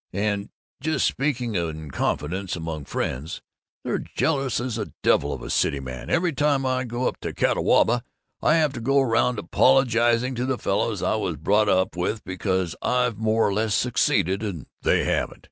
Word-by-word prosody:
And, 100 +1 -1 0.3
just 155 0 0
speaking 125 -5 -1
in 80 -5 -3
confidence 90 +8 -2
among 80 -3 -5
friends, 70 +6 -3 0.4
they're - - -1
jealous 135 -7 -1
as 125 0 -3
the 110 - -5
devil - - +3
of - - -5
a - - -5
city 70 - +1
man. 65 -2 -7
Every 175 -1 +1
time 140 -1 +1
I 130 0 0
go 120 +1 -2
up - - -3
to - - -5
Catawba 120 +1 +2 0.4
I 155 - +4
have 155 -4 +2
to 120 - -6
go 135 +4 +3
around 125 -1 +2
apologizing 120 +5 +3
to 125 0 -2
the 130 -1 0
fellows - - -1
I - - +1
was - - -2
brought 105 +8 +2
up 95 -1 +2
with 105 +5 -2
because 95 -2 -2
I've 125 -4 +1
more 110 0 +2
or 100 - 0
less 110 +1 +1
succeeded 100 -5 +1
and 95 -10 -4 0.2
they - - +2
haven't. - - -1
115 Hz, 180 wpm, -24 LUFS, 95-130 Hz, 0.4 s, I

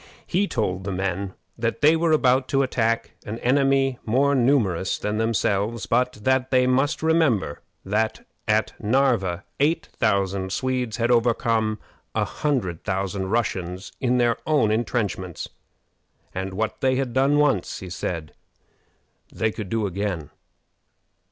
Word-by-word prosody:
He 195 +3 +1
told 95 - -1
the 100 - -3
men 95 0 -2 0.2
that 115 0 -1
they 155 +2 +6
were 165 0 +1
about 130 -3 +3
to 135 0 +2
attack 115 -3 0
an 110 +1 -5
enemy 135 0 +2
more 135 +5 +2
numerous 120 -9 +2
than 105 +1 -2
themselves, 110 -1 0
but 125 +2 +1
that 130 +1 +2
they 130 -1 +4
must 135 +5 +1
remember 155 - +2 0.2
that 110 +3 -1 0.2
at 110 0 +2
Narva 110 -7 +1 0.2
eight 150 +4 +1
thousand 100 -3 0
Swedes 125 +1 -1
had 115 +1 +1
overcome 115 -2 +2 0.4
a - - +2
hundred 120 - -2
thousand 95 -1 -2
Russians 95 -4 -2
in 125 -2 +2
their 120 -1 +2
own 140 -9 +3
intrenchments, 105 -6 -2 0.8
and 95 0 -4
what 110 +2 -2
they 130 -1 +3
had 130 -2 -1
done 135 +3 +3
once, 140 -11 +1
he 95 - -8
said, 85 -3 -4 1.0
they 110 0 0
could 105 -3 -6
do 110 0 0
again. 95 -5 -3
115 Hz, 140 wpm, -24 LUFS, 100-130 Hz, 1.0 s, they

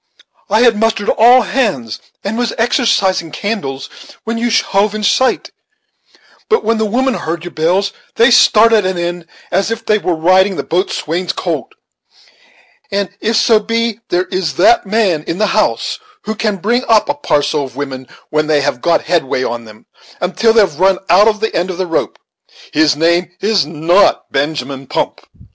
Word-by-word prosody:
I 215 +3 +3
had 235 -3 +4
mustered 225 -2 0
all 245 +3 +6
hands 180 - -2 0.2
and 200 +3 -3
was 245 0 -2
exercising 225 - +1
candles, 155 -6 -4 0.4
when 230 +1 -3
you 240 +1 0
hove 210 -2 +1
in 215 - -4
sight; 260 +5 +1 1.0
but 445 0 +2
when 225 0 0
the 220 - 0
women 260 +5 0
heard 165 -6 -4
your 175 - -7
bells 180 +6 0 0.2
they 235 +2 +4
started 225 -2 +5
an 185 -1 -2
end, 175 0 -4 0.2
as 195 +3 0
if 225 0 -4
they 215 -1 +2
were 180 -4 -1
riding 185 +4 +3
the - - -3
boat 180 +4 -1
swain's 170 +3 -2
colt; - - -4 1.2
and 200 -1 -2
if 225 +2 -1
so 220 0 +4
be 230 0 -2
there 180 +1 0
is 180 -5 -2
that 340 - +3
man 190 -7 +1
in 165 - -3
the 215 - +1
house - - 0 0.2
who 220 - -3
can 215 -1 -1
bring 235 +7 0
up 220 -2 +3
a 290 - 0
parcel 150 - 0
of 130 - -12
women 130 -2 -6 0.2
when 155 0 0
they 150 -2 +2
have 140 -3 -2
got 170 - +1
headway 155 -6 0
on 120 -1 -4
them, 110 0 -16 0.3
until 190 +6 +1
they've 205 -9 +2
run 190 0 +3
out 190 +4 +6 0.2
the 220 - -2
end 175 +2 -1
of 185 - -5
their 185 - -1
rope, 165 -2 -2 0.6
his 155 -2 +3
name 170 +3 +1
is 200 -7 +1
not 165 +5 +1
Benjamin 135 -2 -3
Pump. - - -3
190 Hz, 175 wpm, -15 LUFS, 160-225 Hz, 1.2 s, all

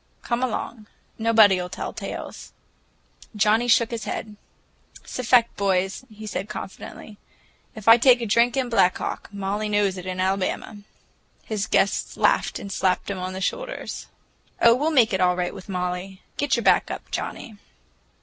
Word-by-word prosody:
Come 240 0 -1
along, 235 -3 -3 0.3
nobody'll 210 -5 +4
tell 185 - -5
tales." - - -7 0.8
Johnnie 215 +3 +3
shook 230 0 +4
his 230 -2 -4
head. 215 -1 -5 0.7
"'S - - -7
a - - -2
fact, 235 -1 +4
boys," 195 +3 0
he 215 0 -10
said 205 0 -4
confidentially. 205 +2 -9 0.6
"If 215 -1 -10
I 225 +1 +9
take 250 0 +6
a 235 - -3
drink 235 +4 +3
in 260 -2 +1
Black 205 -6 +3
Hawk, - - -5
Molly 200 +1 -3
knows 205 -2 +1
it 180 - -8
in 185 0 -4
Omaha!" 190 +3 -1 0.7
His 210 -3 -2
guests 200 - +1
laughed - - +2
and 200 - -7
slapped 185 +1 0
him 195 - -4
on 185 +1 -4
the 190 - -6
shoulder. - - -3 0.7
"Oh, 235 - +7
we'll 290 +6 +1
make 245 -8 +4
it 190 - +1
all 180 0 +3
right 180 0 -2
with 185 - -11
Molly. 180 +1 -4
Get 290 - +1
your - - -2
back - - +4
up, - - -7
Johnnie." 220 -3 -5
210 Hz, 170 wpm, -24 LUFS, 190-235 Hz, 0.8 s, I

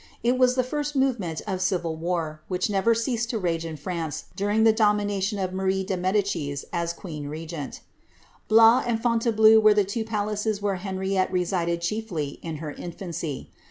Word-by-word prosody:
It 245 +2 +2
was 250 -1 +4
the 255 - +2
first 295 +3 -3
movement 235 - 0
of 190 -3 -3
civil 175 -3 0
war, 160 -2 -3
which 180 +2 -1
never 205 +4 +3
ceased 235 0 -1
to 235 - -1
rage 170 -4 -1
in 160 -1 -5
France 165 0 -4
during 205 +2 +1
the 225 -1 +6
domination 205 -2 +1
of 185 -2 -2
Marie 190 0 0
de 190 0 -2
Medicis 180 -7 -1
as 170 0 -1
queen 155 -5 -7
regent 155 -1 -6 0.7
Blois 225 +3 +7
and 230 -2 +1
Fontainbleau 225 -2 +5
were 215 -1 +5
the 205 - +4
two 210 +4 -2
palaces 210 -1 -2
where 200 -2 -1
Henriette 190 0 -1
resided 175 -2 0
chiefly 170 -6 -3
in 165 -2 -5
her 150 0 -5
infancy. 170 -3 -6
195 Hz, 170 wpm, -25 LUFS, 170-220 Hz, 0.7 s, Blois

